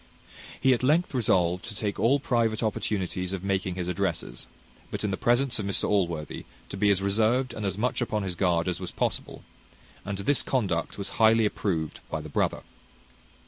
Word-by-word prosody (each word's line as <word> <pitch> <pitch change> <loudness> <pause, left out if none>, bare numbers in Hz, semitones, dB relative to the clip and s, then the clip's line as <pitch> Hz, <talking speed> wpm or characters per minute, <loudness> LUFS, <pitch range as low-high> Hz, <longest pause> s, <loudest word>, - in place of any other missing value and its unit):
He 130 - +5
at 120 - 0
length 155 +7 +2
resolved 90 -7 +2
to 105 - -7
take 105 -1 -2
all 135 +5 +4
private 115 -4 +1
opportunities 95 -4 -2
of 95 -1 -4
making 95 -2 -1
his 90 -1 -3
addresses; 90 -2 -3 0.4
but - - -4
in 105 - 0
the - - 0
presence 120 +3 +2
of 100 - -2
Mr 100 - 0
Allworthy 85 -7 -1 0.2
to - - -5
be 100 +1 +2
as 95 -1 +2
reserved 115 +5 +2
and 105 -3 -3
as 95 0 -3
much 125 +4 0
upon 110 -3 -1
his 90 -2 -3
guard 85 -2 +1
as 90 - -1
was - - -5
possible; - - -3 0.6
and 100 -1 -4
this 115 +8 +2
conduct 95 -11 -1
was 100 0 -2
highly 110 0 +6
approved 85 -7 -2
by 80 - -2
the 75 0 -8
brother. - - 0
100 Hz, 185 wpm, -27 LUFS, 90-115 Hz, 0.6 s, highly